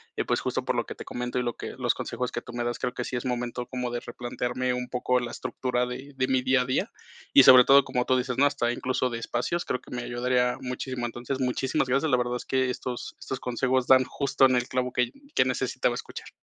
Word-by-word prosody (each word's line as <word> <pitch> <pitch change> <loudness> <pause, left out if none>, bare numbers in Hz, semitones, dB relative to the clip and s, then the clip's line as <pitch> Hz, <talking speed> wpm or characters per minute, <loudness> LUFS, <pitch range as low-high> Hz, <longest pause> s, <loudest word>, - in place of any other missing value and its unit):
eh, - - -1
pues - - +1
justo - - -2
por - - 0
lo - - -1
que - - -6
te - - -9
comento 125 +1 -4
y 125 - +1
lo 120 -1 -1
que - - -7
los - - +1
consejos 125 0 -4
que 120 - -4
tú 120 - -11
me 120 0 -2
das, 120 0 -2
creo - - -1
que 125 - -2
sí 130 - -4
es 120 - -2
momento 125 -1 -3
como 125 -1 -3
de 120 - -2
replantearme 125 +1 -3
un 125 0 -4
poco 125 0 +1
la 120 -1 -4
estructura 125 0 -2
de 130 +3 -7
de 130 0 +1
mi 130 -1 +2
día 130 0 +3
a - - -1
día 130 - -1 0.4
y - - +9
sobre 125 -1 +9
todo, 140 0 +7
como 125 -2 -1
tú 130 - +3
dices, 125 0 -2
¿no?, 145 - +6
hasta 120 -4 0
incluso 125 0 -1
de 115 - -3
espacios, 120 +9 -2
creo 125 - -2
que - - -17
me 120 - -3
ayudaría 125 +1 0
muchísimo. 125 -1 -4
Entonces, 120 +3 -4
muchísimas 130 0 0
gracias. 135 +5 +1
La 125 - +4
verdad 125 0 -1
es - - -9
que 130 -1 +1
estos 125 -1 -5
estos 130 - -5
consejos 125 +1 0
dan 130 0 +6
justo 140 0 +2
en 130 - +2
el 125 0 0
clavo 125 0 -1
que 125 0 0 0.2
que - - +4
necesitaba - - 0
escuchar. - - -7
125 Hz, 255 wpm, -27 LUFS, 125-130 Hz, 0.4 s, y